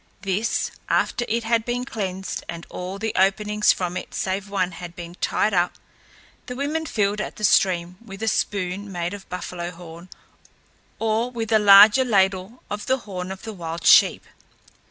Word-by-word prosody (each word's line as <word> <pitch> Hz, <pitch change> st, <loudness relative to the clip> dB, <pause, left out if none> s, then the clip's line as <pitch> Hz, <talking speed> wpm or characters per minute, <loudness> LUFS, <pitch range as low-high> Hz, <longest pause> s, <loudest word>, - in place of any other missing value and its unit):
This, 195 Hz, +3 st, -1 dB, 0.2 s
after 240 Hz, -, +1 dB
it 230 Hz, +1 st, -1 dB
had 230 Hz, 0 st, +1 dB
been 245 Hz, +1 st, -3 dB
cleansed 190 Hz, -6 st, -4 dB
and 170 Hz, 0 st, -6 dB
all 185 Hz, +2 st, -5 dB
the 220 Hz, +1 st, -3 dB
openings 210 Hz, +2 st, +3 dB
from 180 Hz, -1 st, -3 dB
it -, -, -6 dB
save 190 Hz, +1 st, -2 dB
one 185 Hz, -2 st, -1 dB
had 175 Hz, 0 st, -9 dB
been 170 Hz, -1 st, -8 dB
tied 215 Hz, -, +1 dB
up, 175 Hz, -1 st, +2 dB, 0.7 s
the 250 Hz, -, -5 dB
women 305 Hz, +4 st, -2 dB
filled 210 Hz, -3 st, 0 dB
at -, -, -6 dB
the 215 Hz, -, -10 dB
stream 180 Hz, -3 st, +2 dB
with 200 Hz, -1 st, -9 dB
a -, -, -1 dB
spoon 200 Hz, -1 st, -1 dB
made 175 Hz, 0 st, -3 dB
of 200 Hz, -1 st, -10 dB
buffalo 180 Hz, -1 st, -5 dB
horn 170 Hz, 0 st, -12 dB, 0.9 s
or 225 Hz, +2 st, 0 dB
with 230 Hz, -3 st, -5 dB
a 220 Hz, -, +5 dB
larger 205 Hz, +5 st, +8 dB
ladle 195 Hz, 0 st, 0 dB
of 205 Hz, 0 st, -6 dB
the 260 Hz, -, +2 dB
horn 185 Hz, -2 st, -5 dB
of 190 Hz, +1 st, -8 dB
the 220 Hz, -1 st, -6 dB
wild 165 Hz, -3 st, -6 dB
sheep. -, -, +6 dB
200 Hz, 175 wpm, -23 LUFS, 180-220 Hz, 0.9 s, larger